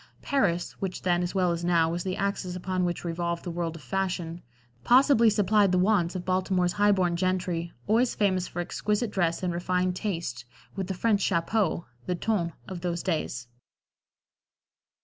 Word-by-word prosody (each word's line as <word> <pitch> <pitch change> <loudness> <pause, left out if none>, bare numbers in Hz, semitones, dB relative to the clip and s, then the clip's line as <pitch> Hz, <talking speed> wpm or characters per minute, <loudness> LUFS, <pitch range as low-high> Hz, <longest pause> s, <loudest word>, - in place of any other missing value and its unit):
Paris 190 -11 +1
(which 190 -2 -4
then, 175 -1 +2
as 175 +2 -3
well 180 -2 +2
as 170 0 -3
now, 170 -2 +3
was 170 +1 -2
the 185 -1 -2
axis 200 -2 -2
upon 185 0 -2
which 175 -1 -2
revolved 170 0 -2
the 175 - -4
world 170 -1 -3
of 160 - -11
fashion) 175 +2 -2 0.4
possibly 250 - +6
supplied 205 -1 +3
the 185 - +3
wants 185 -2 +2
of 180 - -4
Baltimore's 185 -1 +1
highborn 195 -4 +3
gentry, 175 -2 -1
always 230 +4 +2
famous 185 -3 +1
for 175 - -4
exquisite 210 +5 -1
dress 175 -3 0
and 180 -1 0
refined 180 +1 0
taste, 165 - -3 0.3
with 190 -2 -3
the 190 - -3
French 205 +1 +2
chapeau 175 +1 +1 0.2
the 180 - 0
ton 175 -3 0 0.2
of 185 -2 -6
those 170 -1 -2
days. 140 -8 -2
180 Hz, 170 wpm, -27 LUFS, 170-195 Hz, 0.4 s, possibly